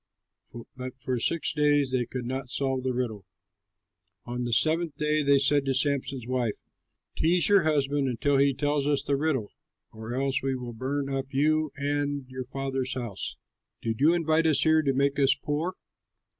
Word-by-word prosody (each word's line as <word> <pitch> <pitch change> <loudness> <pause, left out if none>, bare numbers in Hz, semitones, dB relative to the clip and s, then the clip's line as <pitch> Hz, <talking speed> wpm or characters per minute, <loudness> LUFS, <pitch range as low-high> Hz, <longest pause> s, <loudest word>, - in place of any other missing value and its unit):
But 130 0 -7
for 125 -1 -2
six 165 +7 +1
days 145 -2 +2
they 125 -2 0
could 125 -2 -5
not 130 +1 -4
solve 135 0 -1
the 130 0 -1
riddle. 115 -6 -3 1.0
On 120 0 -3
the 120 - -3
seventh 160 +5 +2
day 150 0 +1
they 140 -1 +4
said 140 +1 +3
to 135 -1 0
Samson's 135 -3 -1
wife, 125 -3 -1 0.6
"Tease 170 +2 +2
your 200 -1 +5
husband 145 -2 +1
until 135 +3 +1
he 140 +1 +4
tells 145 0 0
us 145 -1 +1
the 140 - 0
riddle, 135 -7 -1 0.4
or 110 +2 -7
else 135 +1 0
we 135 -1 -1
will 125 -2 -6
burn 135 +4 -2
up 135 -1 -3
you 155 +3 +2
and 145 -1 -1
your 130 0 -6
father's 135 -1 -3
house. 120 -7 -4 0.5
Did 115 +2 -2
you 160 +4 +5
invite 165 -1 +2
us 145 -3 +3
here 160 0 +4
to 140 -3 +1
make 140 +1 +1
us 135 -1 +5
poor?" 160 +5 -3
140 Hz, 175 wpm, -27 LUFS, 130-145 Hz, 1.0 s, your